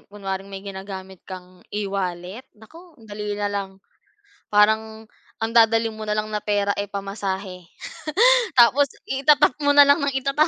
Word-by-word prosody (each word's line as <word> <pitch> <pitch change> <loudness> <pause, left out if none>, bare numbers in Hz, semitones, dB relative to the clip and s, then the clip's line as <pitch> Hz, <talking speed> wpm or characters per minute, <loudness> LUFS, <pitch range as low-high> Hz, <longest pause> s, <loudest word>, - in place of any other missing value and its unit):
kunwaring 195 -1 -6
may 195 0 -9
ginagamit 190 -1 -8
kang 185 -1 -11
e-wallet, 195 0 -4 0.2
naku, 325 +10 -17
ang 225 - -19
dali 210 -1 -5
na 205 0 -2
lang. 200 -1 -3 0.8
Parang 220 +1 +2 0.4
ang 225 - -1
dadalhin 225 -1 +3
mo 215 0 -8
na 210 - 0
lang 215 0 -3
na 210 - -1
pera, 205 -1 0
eh, 205 - -3
pamasahe, 195 -2 -5 0.9
tapos 265 +3 +5 0.2
ita-tap 290 +2 +3
mo 285 0 +2
na 290 - +10
lang 285 0 +4
nang 280 -1 -1
ita-tap. 275 +4 +1
210 Hz, 155 wpm, -22 LUFS, 195-230 Hz, 0.9 s, na